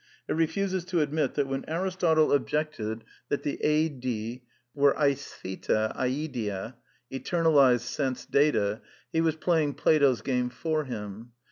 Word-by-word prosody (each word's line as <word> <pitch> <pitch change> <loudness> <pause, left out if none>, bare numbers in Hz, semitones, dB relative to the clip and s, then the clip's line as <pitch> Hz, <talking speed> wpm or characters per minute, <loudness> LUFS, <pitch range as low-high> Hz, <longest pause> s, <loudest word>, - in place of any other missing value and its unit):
It - - 0
refuses 185 +3 0
to 180 -3 0
admit 150 -2 0
that 145 - +1
when 135 0 -3
Aristotle 170 -2 +2
objected 125 -5 -1 0.3
that 145 - -1
the 145 - -3
aSiy 130 -6 0 0.3
were 140 -1 +4
oarftyTa 110 -6 -1
diSta, 125 -6 -2 0.4
eternalized 140 -4 +3
sense 130 +1 -3
data, 110 -8 +2 0.3
he 160 - +2
was 160 -1 +1
playing 160 -3 +1
Plato's 140 -7 +3
game 125 -2 0
for 155 +4 -2
him. 110 -1 -7
140 Hz, 125 wpm, -28 LUFS, 120-155 Hz, 0.4 s, were